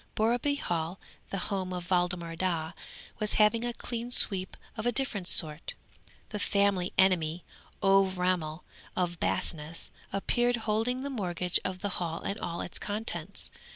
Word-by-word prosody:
Borreby 240 Hz, +6 st, +2 dB
Hall, 170 Hz, -, -2 dB, 0.3 s
the 195 Hz, -, -3 dB
home 190 Hz, -1 st, -1 dB
of 180 Hz, 0 st, -6 dB
Waldemar 175 Hz, -2 st, 0 dB
Daa, 165 Hz, -2 st, -1 dB, 0.5 s
was 210 Hz, 0 st, -1 dB
having 220 Hz, +2 st, +4 dB
a 240 Hz, -, -1 dB
clean 235 Hz, 0 st, -5 dB
sweep 190 Hz, -6 st, +4 dB, 0.2 s
of 220 Hz, +1 st, -2 dB
a -, -, +3 dB
different 220 Hz, -7 st, -1 dB
sort. 155 Hz, -4 st, +5 dB, 0.5 s
The 210 Hz, -, -4 dB
family 200 Hz, -3 st, +1 dB
enemy, 175 Hz, -3 st, +3 dB, 0.4 s
Ové 195 Hz, -1 st, +4 dB
Ramel 180 Hz, -3 st, -1 dB, 0.3 s
from 180 Hz, -1 st, 0 dB
Basness, 160 Hz, 0 st, -2 dB, 0.2 s
appeared, 240 Hz, +5 st, +1 dB
holding 230 Hz, +4 st, 0 dB
the 280 Hz, -, -3 dB
mortgage 180 Hz, -6 st, 0 dB
of 185 Hz, 0 st, -4 dB
the 205 Hz, -, -1 dB
Hall 165 Hz, -2 st, -3 dB
and 200 Hz, -, -3 dB
all 170 Hz, 0 st, -4 dB
its -, -, -4 dB
contents. 215 Hz, +2 st, -2 dB
190 Hz, 150 wpm, -29 LUFS, 175-215 Hz, 0.5 s, sort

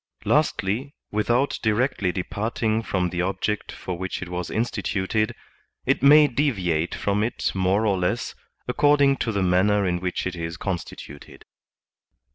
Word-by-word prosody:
Lastly, 115 Hz, +9 st, 0 dB, 0.2 s
without 120 Hz, +6 st, +1 dB
directly 110 Hz, -3 st, +1 dB
departing 110 Hz, +4 st, -1 dB
from 90 Hz, -5 st, -1 dB
the 90 Hz, -, -1 dB
object 95 Hz, +3 st, -2 dB
for 90 Hz, -2 st, -6 dB
which 95 Hz, 0 st, -4 dB
it 90 Hz, -, -8 dB
was 90 Hz, -1 st, -4 dB
instituted, 110 Hz, -2 st, -1 dB, 0.5 s
it -, -, +1 dB
may 150 Hz, +2 st, +8 dB
deviate 95 Hz, -, 0 dB
from 100 Hz, +1 st, 0 dB
it 115 Hz, -, -1 dB
more 95 Hz, +3 st, +1 dB
or 100 Hz, -3 st, +1 dB
less, 90 Hz, -, -1 dB, 0.3 s
according 145 Hz, +1 st, +4 dB
to 115 Hz, -, -1 dB
the 100 Hz, -2 st, 0 dB
manner 95 Hz, +3 st, +3 dB
in 90 Hz, -1 st, 0 dB
which 90 Hz, 0 st, -3 dB
it 90 Hz, -1 st, -3 dB
is 85 Hz, 0 st, -5 dB
constituted. 85 Hz, -6 st, -7 dB
100 Hz, 140 wpm, -24 LUFS, 90-115 Hz, 0.5 s, may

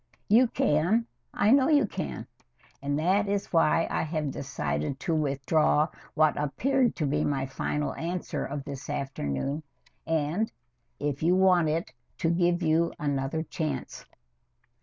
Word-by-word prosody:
You 240 Hz, +5 st, +6 dB
can 200 Hz, +2 st, +2 dB, 0.3 s
I 205 Hz, +2 st, +2 dB
know 270 Hz, 0 st, +5 dB
you 290 Hz, -6 st, +5 dB
can 185 Hz, -, -5 dB, 0.6 s
and 145 Hz, +1 st, -1 dB
that 190 Hz, +6 st, +2 dB
is 200 Hz, -1 st, -2 dB
why 165 Hz, 0 st, +3 dB
I -, -, 0 dB
have 155 Hz, -3 st, -2 dB
decided 75 Hz, -, -3 dB
to 170 Hz, -, -1 dB
withdraw 150 Hz, +1 st, +2 dB, 0.3 s
what 155 Hz, -1 st, +4 dB
appeared 250 Hz, -, +1 dB
to 155 Hz, -, -1 dB
be 150 Hz, +2 st, +1 dB
my 135 Hz, -2 st, 0 dB
final 150 Hz, +2 st, -2 dB
answer 175 Hz, +2 st, -3 dB
of 140 Hz, 0 st, -4 dB
this 140 Hz, -3 st, -7 dB
afternoon, 135 Hz, -, -2 dB, 0.5 s
and, 165 Hz, +7 st, 0 dB, 0.5 s
if 145 Hz, -1 st, -2 dB
you 170 Hz, +3 st, +3 dB
want 185 Hz, -4 st, +4 dB
it, 160 Hz, -3 st, -2 dB, 0.2 s
to 165 Hz, -, +1 dB
give 175 Hz, 0 st, +2 dB
you 165 Hz, +1 st, +2 dB
another 145 Hz, +1 st, -1 dB
chance. 155 Hz, -1 st, -4 dB
155 Hz, 140 wpm, -28 LUFS, 140-180 Hz, 0.6 s, You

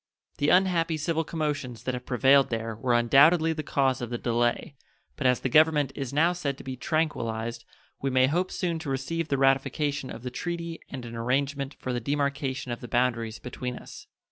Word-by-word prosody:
The 145 Hz, -, +2 dB
unhappy 175 Hz, -3 st, +3 dB
civil 160 Hz, +1 st, 0 dB
commotions 145 Hz, -7 st, -3 dB
that 130 Hz, -, -2 dB
have 125 Hz, 0 st, -6 dB
prevailed 135 Hz, +2 st, +4 dB
there 115 Hz, -1 st, -3 dB
were 120 Hz, +2 st, +1 dB
undoubtedly 155 Hz, +7 st, +5 dB
the 155 Hz, -, -4 dB
cause 135 Hz, -3 st, 0 dB
of 120 Hz, -, -4 dB
the 120 Hz, -, -3 dB
delay, 120 Hz, +3 st, 0 dB, 0.4 s
but 140 Hz, -, 0 dB
as 125 Hz, -1 st, +2 dB
the -, -, 0 dB
Government 150 Hz, 0 st, +4 dB
is 135 Hz, -3 st, -5 dB
now 165 Hz, +5 st, +3 dB
said 145 Hz, -6 st, -3 dB
to -, -, -11 dB
be 130 Hz, -1 st, -5 dB
tranquillized 120 Hz, -7 st, -2 dB, 0.4 s
we 135 Hz, -, 0 dB
may 130 Hz, 0 st, +4 dB
hope 175 Hz, +7 st, 0 dB
soon 170 Hz, -3 st, -2 dB
to 160 Hz, -3 st, -6 dB
receive 150 Hz, +5 st, -2 dB
the 140 Hz, -, 0 dB
ratification 135 Hz, +1 st, +1 dB
of 115 Hz, -, -8 dB
the 125 Hz, -, -4 dB
treaty 170 Hz, +3 st, -4 dB
and 130 Hz, -3 st, -7 dB
an 115 Hz, 0 st, -8 dB
arrangement 135 Hz, +4 st, -1 dB
for 130 Hz, -, -4 dB
the 120 Hz, -, -1 dB
demarcation 140 Hz, 0 st, -2 dB
of 120 Hz, -, -5 dB
the 120 Hz, -, -7 dB
boundaries 115 Hz, -2 st, 0 dB
between 125 Hz, 0 st, -5 dB
us. -, -, -11 dB
135 Hz, 195 wpm, -27 LUFS, 125-155 Hz, 0.4 s, undoubtedly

